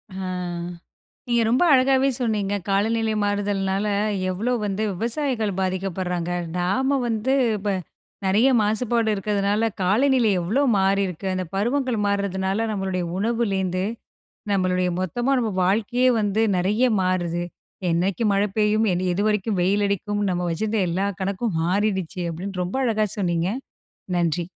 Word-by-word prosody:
ஆ. - - -6 1.1
நீங்க 240 -1 +2
ரொம்ப 250 +8 +3
அழகாவே 265 +1 +4
சொன்னீங்க! 210 -4 0
காலநிலை 220 +3 +1
மாறுதல்னால, 200 0 0 0.4
எவ்ளோ 220 +7 -1
வந்து 205 +1 -2
விவசாயிகள் 230 - -1
பாதிக்கப்படுறாங்க! 185 -2 -2 0.3
நாம 235 +11 +1
வந்து 230 +3 0 0.2
இப்ப 205 0 -2 0.5
நிறைய 210 +7 +4
மாசுபாடு 220 +1 +1
இருக்கதுனால, 205 +2 0 0.2
காலநிலை 240 +4 +3
எவ்ளோ 210 +11 +1 0.2
மாறியிருக்கு! 195 -2 0
அந்த 185 -1 -2
பருவங்கள் 245 +3 0
மாறுதுனால, 200 0 -1
நம்மளுடைய 190 -3 -2
உணவுலேந்து 195 -5 0 0.7
நம்மளுடைய 185 -1 +1
மொத்தமா 240 +9 -1
நம்ம 225 -3 -1
வாழ்க்கையே 230 +6 +2
வந்து 205 0 +1 0.2
நிறைய 205 +7 +2 0.2
மாறுது. 175 -2 0 0.5
என்னைக்கு 180 +6 0
மழை 200 +1 +2
பெய்யும்? 215 +1 +3 0.3
எதுவரைக்கும் 210 0 0
வெயிலடிக்கும்? 200 +2 0
நம்ம 180 0 -1
வச்சிருந்த 215 +5 -1
எல்லா 190 +4 0
கணக்கும் 195 0 -1
மாறிடுச்சு, 190 -2 -1
அப்படின்னு 185 +3 -5
ரொம்ப 180 +8 -3
அழகாக 215 -3 +1
சொன்னீங்க. 175 -2 0 0.7
நன்றி. 175 -1 +1
200 Hz, 115 wpm, -23 LUFS, 185-225 Hz, 1.1 s, அழகாவே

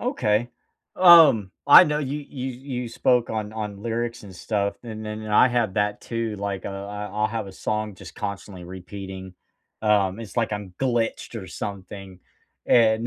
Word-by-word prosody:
Okay. 120 - 0 0.5
Um, 165 - +7 0.2
I 145 - +10
know 150 0 0
you 145 0 -3
you 130 -1 -5 0.3
you 120 - -5
spoke 120 +1 +2
on 110 -1 -3
on 105 -2 -5
lyrics 115 +1 -3
and 100 -3 -11
stuff, 100 +1 -2
and 110 -2 -7
then 110 0 -6
I 105 +4 +5
have 120 -5 0
that 105 -1 0
too, 115 -2 -3
like, 100 -1 -4
uh, - - -2 0.2
I 105 0 -5
I'll 105 +1 -1
have 110 -2 -4
a 95 - -9
song 105 +2 -3
just 90 -1 -12
constantly 100 -3 -6
repeating, 95 +1 -8 0.5
um, 105 -1 +2
it's 110 -1 -10
like 115 -2 0
I'm 105 -3 -5
glitched 120 -2 -1
or 95 - -9
something, 95 -1 -7 0.5
and 115 -1 +4
105 Hz, 170 wpm, -24 LUFS, 100-115 Hz, 0.5 s, I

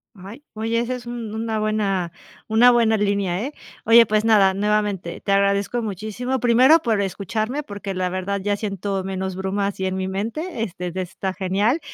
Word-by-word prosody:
Ay, 200 +9 -11
oye, 225 +1 -1
ese 240 +2 -2
es 245 -2 -9
un 235 -3 -5
una 220 0 -2
buena 200 -5 0 0.4
una 225 +3 +6
buena 225 -2 +3
línea, 200 -3 0
eh. 290 - -6 0.3
Oye, 230 +1 +7
pues 215 0 +1
nada, 205 -4 +5
nuevamente 205 -3 -1
te 200 - -2
agradezco 200 +4 +2
muchísimo, 220 +5 -3
primero 250 +7 +5
por 220 -4 +1
escucharme, 215 +8 -3
porque 200 -4 -6
la 185 0 -1
verdad 185 +2 -2
ya 205 +1 0
siento 200 -2 -3
menos 190 -1 -4
brumas 195 +1 -2
y 190 - 0
en 185 - -2
mi 190 0 -2
mente, 225 - -4
este, 180 -3 -5
de 185 +2 -3
está 190 +1 -4
genial 200 - 0
205 Hz, 180 wpm, -22 LUFS, 190-225 Hz, 0.4 s, Oye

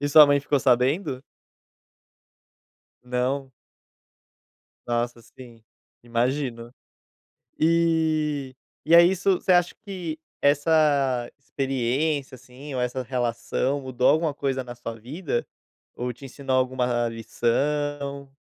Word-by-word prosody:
E 145 - -1
sua 150 +1 +9
mãe 145 0 +3
ficou 140 +1 +1
sabendo? 130 +2 +1 1.8
Não? 125 +2 -2 1.4
Nossa, 120 0 -1
sim, 115 -1 -15 0.4
imagino. 120 0 -2 0.9
E 155 -4 +1 0.3
e 165 - +4
é 170 - +10
isso 190 +2 +2
você 185 - +2
acha 175 -1 +3
que 180 -6 -5 0.2
essa 145 -4 +2
experiência, 135 +1 -1
assim, 130 +4 -11
ou 130 - -1
essa 125 +1 -2
relação 125 +2 -1
mudou 130 -2 0
alguma 160 -1 +3
coisa 135 -2 -2
na 120 -1 -9
sua 115 -1 -6
vida, 135 - -3 0.5
ou 125 0 -3
te 125 - -14
ensinou 135 0 -2
alguma 125 -2 +1
lição? 140 +5 -2
135 Hz, 105 wpm, -25 LUFS, 125-150 Hz, 1.8 s, é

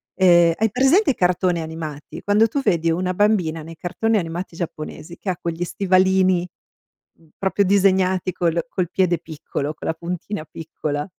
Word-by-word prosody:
Ehm, 175 -2 +5
hai 220 -1 +1
presente 270 - +4
i - - -4
cartoni 180 -1 +1
animati? 160 -2 -7
Quando 210 +2 +4
tu 255 +6 -2
vedi 165 -5 +2
una 180 +2 -1
bambina 180 -5 +1
nei 165 +1 -10
cartoni 215 +7 0
animati 170 -1 -4
giapponesi 165 0 -7
che 195 - -5
ha 180 - -1
quegli 170 0 -3
stivalini 185 0 +2 0.9
proprio 195 +1 +1
disegnati 190 -1 +2
col 170 -1 0
col 185 -7 -2
piede 180 -2 +1
piccolo, 155 -2 -5
con - - -9
la - - +2
puntina 175 +1 -5
piccola, 150 -2 -5
180 Hz, 155 wpm, -21 LUFS, 165-190 Hz, 0.9 s, Ehm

